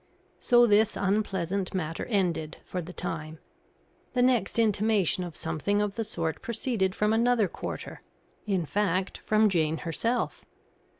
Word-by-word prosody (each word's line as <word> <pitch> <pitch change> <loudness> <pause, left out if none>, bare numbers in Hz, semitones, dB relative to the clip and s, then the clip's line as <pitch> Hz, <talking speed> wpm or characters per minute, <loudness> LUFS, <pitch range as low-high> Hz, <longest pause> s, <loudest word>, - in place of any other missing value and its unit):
So 240 -1 +5
this 215 -1 +3
unpleasant 195 -2 -1
matter 165 -3 -3
ended, 175 -7 -1
for 180 - -4
the 175 +2 -8
time. 160 -3 -5 0.8
The 245 - +2
next 245 -6 +2
intimation 210 -4 +2
of 175 -3 -7
something 165 +5 -1
of 210 -1 0
the 225 - -2
sort 165 -7 -3
proceeded 220 -5 -1
from 210 +1 +2
another 230 -2 +3
quarter - - -7 0.5
in 190 -5 0
fact, 190 +1 -1
from 215 0 +3
Jane 160 -5 +1
herself. 230 +9 -1
195 Hz, 135 wpm, -28 LUFS, 170-220 Hz, 0.8 s, So